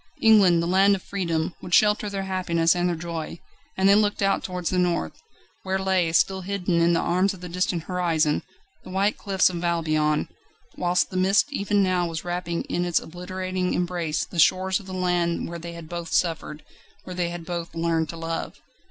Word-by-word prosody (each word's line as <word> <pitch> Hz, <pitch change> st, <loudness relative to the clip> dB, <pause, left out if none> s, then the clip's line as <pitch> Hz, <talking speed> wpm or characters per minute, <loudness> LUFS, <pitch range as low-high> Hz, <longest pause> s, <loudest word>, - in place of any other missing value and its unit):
England, 195 Hz, -7 st, +5 dB
the -, -, -1 dB
land 195 Hz, +3 st, +4 dB
of 190 Hz, -, -8 dB
freedom, 170 Hz, -4 st, -2 dB
would 180 Hz, -, +1 dB
shelter 210 Hz, -1 st, +3 dB
their 195 Hz, -1 st, -3 dB
happiness 175 Hz, -3 st, +1 dB
and 175 Hz, 0 st, +1 dB
their 175 Hz, -, -1 dB
joy; 165 Hz, 0 st, -5 dB, 0.4 s
and 190 Hz, 0 st, +3 dB
they 200 Hz, -, +7 dB
looked 205 Hz, -1 st, +2 dB
out 195 Hz, -, +1 dB
towards 180 Hz, -2 st, -3 dB
the 185 Hz, -, +1 dB
North, 175 Hz, -, -1 dB, 0.4 s
where 190 Hz, 0 st, -1 dB
lay, 190 Hz, -3 st, +1 dB
still 190 Hz, +3 st, +2 dB
hidden 180 Hz, -2 st, -1 dB
in 170 Hz, +1 st, +4 dB
the 165 Hz, -, +2 dB
arms 185 Hz, +3 st, +1 dB
of 180 Hz, -, -15 dB
the 180 Hz, -, -6 dB
distant 180 Hz, -1 st, -1 dB
horizon, 165 Hz, -4 st, 0 dB, 0.4 s
the -, -, -11 dB
white 195 Hz, +3 st, +1 dB
cliffs 195 Hz, -3 st, +2 dB
of 175 Hz, -1 st, -5 dB
Albion, 155 Hz, -3 st, +1 dB, 0.5 s
whilst 180 Hz, 0 st, +1 dB
the 185 Hz, -, -3 dB
mist 195 Hz, +10 st, +2 dB
even 205 Hz, -3 st, +1 dB
now 180 Hz, -2 st, +1 dB
was 165 Hz, 0 st, -5 dB
wrapping 175 Hz, -1 st, -3 dB
in 175 Hz, -, -2 dB
its 175 Hz, -1 st, +2 dB
obliterating 185 Hz, +1 st, -4 dB
embrace 175 Hz, -3 st, -1 dB
the 175 Hz, -, -6 dB
shores 185 Hz, +4 st, +3 dB
of 195 Hz, -, -14 dB
the -, -, -8 dB
land 175 Hz, -2 st, 0 dB
where 170 Hz, 0 st, -6 dB
they 170 Hz, +1 st, -7 dB
had 170 Hz, -1 st, -9 dB
both 170 Hz, 0 st, -6 dB
suffered, 160 Hz, -3 st, -1 dB, 0.4 s
where 185 Hz, -, -8 dB
they 175 Hz, -1 st, -1 dB
had 170 Hz, -1 st, -7 dB
both 170 Hz, -1 st, -5 dB
learned 165 Hz, -1 st, 0 dB
to 165 Hz, -, -6 dB
love. 165 Hz, 0 st, -4 dB
180 Hz, 200 wpm, -24 LUFS, 170-190 Hz, 0.5 s, they